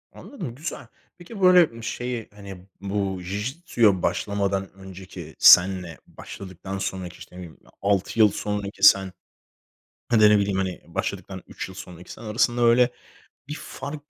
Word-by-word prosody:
Anladım, 165 - -9
güzel. 145 -3 -7 0.3
Peki, 195 +4 -10
böyle, 180 -1 +7
ımm, 115 0 -11
şeyi, 120 -1 -4
hani, 100 -3 -11 0.2
bu 100 -1 -3
Jijitsu'ya 105 - 0
başlamadan 100 +1 -1
önceki 95 -1 -11
senle 90 -2 +6
başladıktan 95 0 -9
sonraki, 95 -2 -5
işte, - - -14
ne - - -9
bileyim, 85 -3 -11 0.2
6 100 +2 0
yıl 105 -2 +6
sonraki 105 0 -5
sen, 95 -1 +6 0.9
hani, 115 -3 +3
ya 105 - +8
da, - - +5
ne 105 - +4
bileyim, 100 -1 -1
hani, 95 -2 -3
başladıktan - - -5
3 - - -7
yıl 95 - -12
sonraki 90 -1 -11
sen - - -11
arasında 120 +2 0
öyle 120 +1 +5 0.6
bir 150 - -5
fark 145 +2 -8
100 Hz, 155 wpm, -24 LUFS, 95-120 Hz, 0.9 s, ya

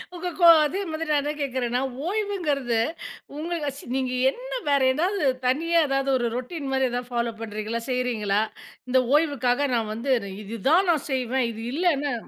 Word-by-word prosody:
உங்க 355 +1 -4
கோ 345 - +7 0.2
அதே 305 +7 -1
மாரி 315 +1 -3
நான் 295 - +3
என்ன 295 +1 -2
கேட்கிறேன்னா, 255 -2 -1 0.3
ஓய்வுங்கிறது 340 - 0 0.6
உங்களு 320 -1 -2
சி - - -11
நீங்க 260 -1 -1 0.2
என்ன - - -10 0.2
வேற 280 -1 +3
ஏதாவது 360 +3 0 0.2
தனியா 330 +6 +2
ஏதாவது 275 0 0
ஒரு 240 - 0
ரொட்டின் 275 +3 -4
மாரி 265 -1 +2
ஏதாவது 245 +1 -4
ஃபாலோ 235 -1 -1
பண்றீங்களா, 220 +1 -4
செய்றீங்களா? 230 -5 0 0.5
இந்த 255 0 +4
ஓய்வுக்காக 285 -3 +2
நான் 225 -2 -1
வந்து, 260 +4 -2 0.3
"இது 225 +3 -6
தான் 355 +4 +4
நான் 305 -3 -1
செய்வேன். 255 -1 0
இது 225 - -8
இல்லன்னா" 295 -4 +1
270 Hz, 160 wpm, -25 LUFS, 245-320 Hz, 0.6 s, கோ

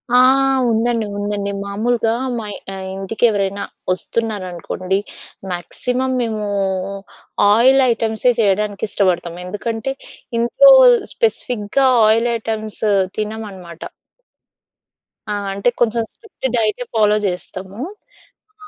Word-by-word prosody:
ఆ! - - +7 0.5
ఉందండి. 230 0 +1
ఉందండి. 205 0 -2
మామూలుగా 225 +3 0 0.3
మాయ్ 210 -2 -5 0.2
ఆహ్, 190 0 -6
ఇంటికి 195 +4 -5
ఎవరైనా 200 -1 -1 0.3
ఒస్తున్నారనుకోండి. 185 -3 -2 0.5
మాక్సిమం 250 +9 -2
మేము 220 -3 -2 1.1
ఆయిల్ 260 +5 +5
ఐటెమ్స్ 220 -1 -2
ఎ - - -1
చేయడానికి 205 0 +1
ఇష్టపడతాం. 175 -4 0
ఎందుకంటే 225 +6 -3 0.5
ఇంట్లో - - +6 0.4
స్పెసిఫిక్‌గా 265 - 0 0.2
ఆయిల్ 230 +2 +3
ఐటెమ్స్ 220 -1 -5 0.3
తినమనమాట. 205 -6 -6 1.5
ఆ! - - 0 0.2
అంటే 200 +5 +1
కొంచెం 230 0 +2
స్ట్రిక్ట్ 440 - -6
డైట్ 220 +1 0
ఫాలో 210 -1 +4
జేస్తాము. 190 +2 -5 0.9
ఆ! - - -13
215 Hz, 95 wpm, -19 LUFS, 195-230 Hz, 1.5 s, ఆ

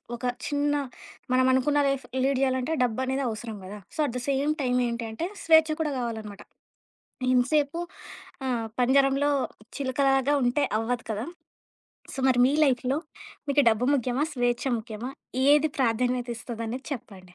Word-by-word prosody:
ఒక 240 - -13 0.2
చిన్న 290 0 +1 0.6
మనం 255 0 +4
అనుకున్న 290 +3 +2
లైఫ్ 270 -2 -2 0.2
లీడ్ 270 -1 +2
జేయాలంటే, 260 +3 +1
డబ్బు 240 -1 -1
అనేది 265 +1 -1
అవసరం 220 -1 -6
కదా! 205 +2 -8 0.2
So - - -11
at 240 - -6
the - - -4
same 280 +2 +1
time 250 -1 +1
ఏంటి 235 0 -3
అంటే, 325 +11 -3 0.2
స్వేచ్ఛ 320 -1 +6
కూడా 300 -2 0
కావాలనమాట. 220 -4 -5 0.9
ఎంతసేపు 285 +5 +2 0.7
ఆహ్, 235 -3 -1
పంజరంలో 275 +3 +3 0.5
చిలుకలాగా 270 0 +2
ఉంటే 250 +4 +2
అవ్వదు 230 +1 -2
కదా! 215 +2 -3 0.9
సో - - -10
మరి, 255 -2 +3
మీ 270 - +2
లైఫ్‌లో 260 +1 +1 0.5
మీకు 285 +1 +4
డబ్బు 220 +2 0
ముఖ్యమా? 255 +1 0
స్వేచ్ఛ 245 0 0
ముఖ్యమా? 225 +2 -6 0.4
ఏది 295 +1 +5
ప్రాధాన్యత 245 0 +1
ఇస్తదనేది 230 0 -6
అనేది 255 +3 -5
చెప్పండి. 185 -8 -9
255 Hz, 145 wpm, -26 LUFS, 235-275 Hz, 0.9 s, స్వేచ్ఛ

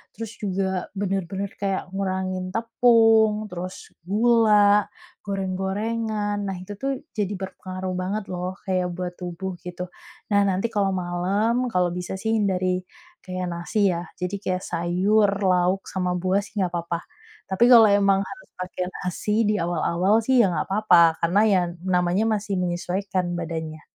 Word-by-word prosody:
terus 225 0 -6
juga 190 -2 -2
benar-benar 195 0 -2
kayak 195 -1 -1
ngurangin 185 -1 -2
tepung, 225 -2 +4
terus 185 0 -7
gula, 210 0 +4 0.4
goreng-gorengan, 205 +2 -2
nah 195 - -3
itu 200 +3 -8
tuh 275 +6 -2 0.2
jadi 205 -2 -1
berpengaruh 185 -1 -5
banget 195 +3 -2
loh 180 +1 -3 0.2
kayak 185 -1 +1
buat 180 0 -4
tubuh 180 +1 -5
gitu. 180 0 -6 0.4
Nah 200 0 +4
nanti 195 +4 0
kalau 205 -3 0
malam, 195 +7 0
kalau 180 -1 +2
bisa 180 +1 -4
sih 220 +2 -1
hindari 185 -3 0 0.4
kayak 185 -1 -4
nasi 190 +3 +1
ya, 170 +1 -3 0.2
jadi 180 +2 -2
kayak 185 0 -1
sayur, 195 +5 +2 0.2
lauk, 185 +1 +2
sama 180 -1 -1
buah 185 +2 +1
sih 210 - -14
nggak 180 -2 +1
apa-apa. 170 0 -2 0.5
Tapi 190 +5 +2
kalau 230 -2 +9
emang 200 -1 +4
harus - - -11
pakai 185 0 -4
nasi 180 +3 -3 0.2
di 210 - +2
awal-awal 175 +3 +1
sih 260 -2 +4
ya - - +4
nggak - - -1
apa-apa, 175 -5 +4
karena 180 +5 +3
ya 190 - +5 0.3
namanya 180 +3 +2
masih 205 -1 -2
menyesuaikan 180 +1 -2
badannya. 160 -2 -5
190 Hz, 145 wpm, -24 LUFS, 180-205 Hz, 0.5 s, kalau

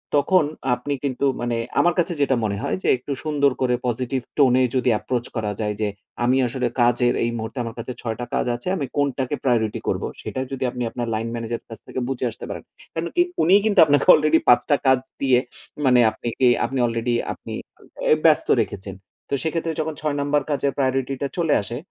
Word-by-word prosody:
তখন 150 +3 +4 0.3
আপনি 140 +4 -4
কিন্তু 135 -1 -1 0.2
মানে, 120 -1 -1 0.2
আমার 175 -1 +4
কাছে 175 +1 +1
যেটা 135 -2 +3
মনে 100 -2 -1
হয় 140 - -1
যে - - -1
একটু 135 +3 -8
সুন্দর 145 -2 +2
করে 125 -1 +2
positive 125 +1 -2
tone 130 -3 +5
এ - - +4
যদি 130 0 +2
approach 125 -1 -3
করা 110 -2 -1
যায় 105 -1 -1
যে, 105 - +1 0.4
আমি 130 +2 +3
আসলে 125 0 -1
কাজের 120 0 +3
এই 120 - +1
মুহূর্তে 110 +4 -6
আমার 115 -1 -6
কাছে 120 +2 -5
ছয়টা 115 +1 -4
কাজ - - +1
আছে, 120 - -8
আমি 145 -7 -2
কোনটাকে 140 -1 0
প্রায়োরিটি 110 -4 +1
করবো, - - -1
সেটা - - -5
যদি 135 -1 -3
আপনি 125 -1 -4
আপনার 120 -1 -4
লাইন 110 +1 -2
ম্যানেজারের 115 0 -4
কাছ 115 - -9
থেকে - - -4
বুঝে 130 -1 -2
আসতে - - -9
পারেন। - - -6 0.3
কারণ 165 +1 -2
কি 350 - +5 0.2
উনিই 195 +5 +5
কিন্তু 205 -4 +3
আপনাকে 145 -1 +3
already 155 +1 +4
৫ 120 - +7
টা 145 - +5
কাজ 130 -1 +5 0.2
দিয়ে 130 -2 +4 0.5
মানে 125 -1 +5
আপনি 110 - -8 0.2
এ - - +7 0.2
আপনি 135 -1 -3
আলরেডি 115 +1 -1 0.2
আপনি - - -9 0.5
অ্যা 155 - +5
ব্যস্ত 155 -2 +4
রেখেছেন। 100 -2 -5 0.3
তো - - -4
সেক্ষেত্রে 165 0 -1
যখন 155 0 -1
৬ 150 -2 -1
নাম্বার 145 +1 +1
কাজের 140 -1 0
priority 135 -1 0
টা 140 - 0
চলে 165 -4 +2
আসে, 115 +5 -6
130 Hz, 205 wpm, -22 LUFS, 120-145 Hz, 0.5 s, ৫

